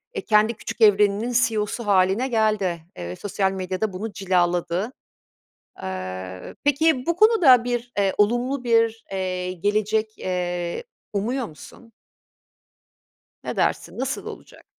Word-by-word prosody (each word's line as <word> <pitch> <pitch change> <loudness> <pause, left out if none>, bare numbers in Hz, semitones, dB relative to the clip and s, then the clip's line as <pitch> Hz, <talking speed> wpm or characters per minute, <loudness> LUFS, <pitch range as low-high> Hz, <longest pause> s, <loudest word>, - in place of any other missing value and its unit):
eee, - - -2
kendi 215 +1 +3
küçük 230 - -8
evreninin 210 +2 +4
CEO'su 215 +1 -3
hâline 195 +5 +3
geldi. 215 -7 +1 0.2
Eee, 90 0 -5
sosyal 195 - -1
medya 185 -1 -4
da 215 -3 0
bunu 210 +4 -5
cilaladı. 180 +1 0 0.9
Eee, 95 0 -6
peki 290 -2 +2
bu 340 - +1
konuda 355 - +6
bir, 245 0 -3
eee, 195 -1 +2
olumlu 245 +5 +1
bir, 230 -1 +2
eee, 185 -1 -2
gelecek, 215 +4 -1
eee, 180 - -3 0.3
umuyor 235 +5 -1
musun? 230 +9 -14 1.5
Ne - - -4
dersin, - - -1
nasıl 265 +1 -3
olacak? - - -11
210 Hz, 120 wpm, -23 LUFS, 185-235 Hz, 1.5 s, konuda